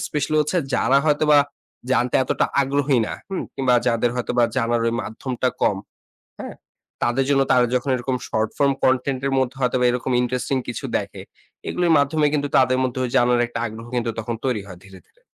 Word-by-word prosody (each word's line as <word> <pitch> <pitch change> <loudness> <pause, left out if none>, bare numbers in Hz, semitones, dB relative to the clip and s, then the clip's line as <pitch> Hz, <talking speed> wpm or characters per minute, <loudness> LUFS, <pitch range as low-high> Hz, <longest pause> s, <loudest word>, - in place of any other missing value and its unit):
Special 150 +1 -2
হচ্ছে 150 +4 0 0.2
যারা 135 +3 +3
হয়তোবা 150 0 +4 0.5
জানতে 125 -1 +1
এতটা - - 0 0.2
আগ্রহী 140 -1 +1
না, - - -5 0.2
হুম? 190 - -2
কিংবা 130 -2 +2
যাদের 120 0 +1
হয়তোবা 120 0 +1
জানার 120 -1 +1
ওই 115 - +1
মাধ্যমটা 125 +4 -3
কম, 100 - +2 0.6
হ্যাঁ? - - -7 0.5
তাদের 120 +3 +1
জন্য 140 -1 +3
তারা 125 -1 +5
যখন 125 +2 -1
এরকম 125 +1 -2
short 110 -1 0
form 140 -1 +3
content 130 0 +1
এর - - -2
মধ্যে 130 0 -1
হয়তো 125 0 +1
বা 125 - +3
এরকম 125 +1 -2
ইন্টারেস্টিং 125 +2 -1
কিছু 120 - -5
দেখে, - - -7 0.5
এগুলির 175 -2 +1
মাধ্যমে 150 +2 +1
কিন্তু 145 -1 0
তাদের 130 -1 +3
মধ্যে 130 0 -2
ওই 125 - -4
জানার 120 -1 +3
একটা 115 - -5
আগ্রহ 110 +1 -9
কিন্তু 120 -1 -1 0.4
তৈরি 125 -6 0
হয় 95 -3 -11
ধীরে, 95 -1 -14
ধীরে। - - -34
130 Hz, 185 wpm, -22 LUFS, 120-140 Hz, 0.6 s, তারা